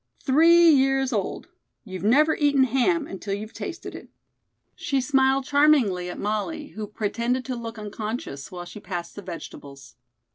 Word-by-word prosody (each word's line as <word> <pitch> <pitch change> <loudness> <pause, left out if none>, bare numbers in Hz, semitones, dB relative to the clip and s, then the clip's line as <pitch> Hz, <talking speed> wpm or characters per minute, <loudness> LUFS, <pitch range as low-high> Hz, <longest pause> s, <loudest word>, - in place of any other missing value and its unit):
Three 330 +4 +6
years 270 -2 +2
old. 205 -3 -3 0.4
You've 185 -5 -7
never 300 +9 +4
eaten 285 -3 +3
ham 270 +6 +1
until 195 -2 -5
you've 215 +2 -8
tasted 350 - -7
it." - - -11 0.7
She 275 -2 -1
smiled 265 0 +2
charmingly 265 -12 +3
at 175 - -7
Molly, 250 +9 -3
who 215 -1 -7
pretended 235 +4 -2
to 255 - -3
look 230 -1 -7
unconscious 210 - -6
while 175 -1 -7
she 175 +4 -10
passed 175 -4 -6
the 205 - -7
vegetables. 140 -7 -10
240 Hz, 150 wpm, -24 LUFS, 200-275 Hz, 0.7 s, Three